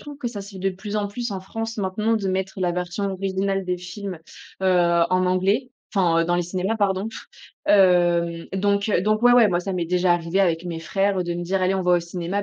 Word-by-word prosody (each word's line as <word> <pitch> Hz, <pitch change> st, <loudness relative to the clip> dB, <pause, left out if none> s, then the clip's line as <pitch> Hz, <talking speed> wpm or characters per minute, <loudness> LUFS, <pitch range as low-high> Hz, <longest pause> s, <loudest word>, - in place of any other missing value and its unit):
trouve 290 Hz, -1 st, -10 dB
que 260 Hz, -, -4 dB
ça 230 Hz, -4 st, -4 dB
se 200 Hz, +1 st, -10 dB
fait 195 Hz, -, -10 dB
de 195 Hz, +1 st, 0 dB
plus 205 Hz, +3 st, -6 dB
en 205 Hz, -1 st, 0 dB
plus 235 Hz, +4 st, -5 dB
en 195 Hz, -2 st, -4 dB
France 225 Hz, +4 st, -5 dB
maintenant, 210 Hz, +3 st, 0 dB
de 205 Hz, -3 st, -3 dB
mettre 190 Hz, 0 st, -2 dB
la 175 Hz, -1 st, +1 dB
version 180 Hz, +3 st, -3 dB
originale 195 Hz, 0 st, -1 dB
des 180 Hz, 0 st, -2 dB
films, 180 Hz, +1 st, -7 dB, 0.4 s
heu, -, -, +2 dB
en 175 Hz, 0 st, +3 dB
anglais. 195 Hz, +8 st, +1 dB, 0.2 s
Enfin, 175 Hz, -4 st, +3 dB
heu, -, -, -1 dB
dans 175 Hz, +1 st, 0 dB
les 175 Hz, -, +1 dB
cinémas, 185 Hz, +5 st, -2 dB
pardon. 200 Hz, 0 st, 0 dB, 0.6 s
Hem, 175 Hz, -3 st, +3 dB
donc, 200 Hz, +2 st, +1 dB
heu, 200 Hz, -, +2 dB
donc 215 Hz, +3 st, +1 dB
ouais, 245 Hz, -, +6 dB
ouais. 245 Hz, -2 st, +7 dB
Moi 175 Hz, -1 st, +1 dB
ça 195 Hz, +1 st, -4 dB
m'est 175 Hz, -2 st, -1 dB
déjà 180 Hz, 0 st, +2 dB
arrivé 175 Hz, +2 st, 0 dB
avec 170 Hz, -3 st, +1 dB
mes 170 Hz, -2 st, -5 dB
frères, 195 Hz, +3 st, 0 dB
heu, 180 Hz, -, +1 dB
de 175 Hz, 0 st, -3 dB
me 175 Hz, -, -4 dB
dire: 185 Hz, +1 st, -1 dB
«Allez 185 Hz, +1 st, +2 dB
on 190 Hz, -, -1 dB
va 180 Hz, 0 st, +2 dB
au 175 Hz, -, +4 dB
cinéma, 175 Hz, +3 st, -3 dB
190 Hz, 245 wpm, -23 LUFS, 175-200 Hz, 0.6 s, ouais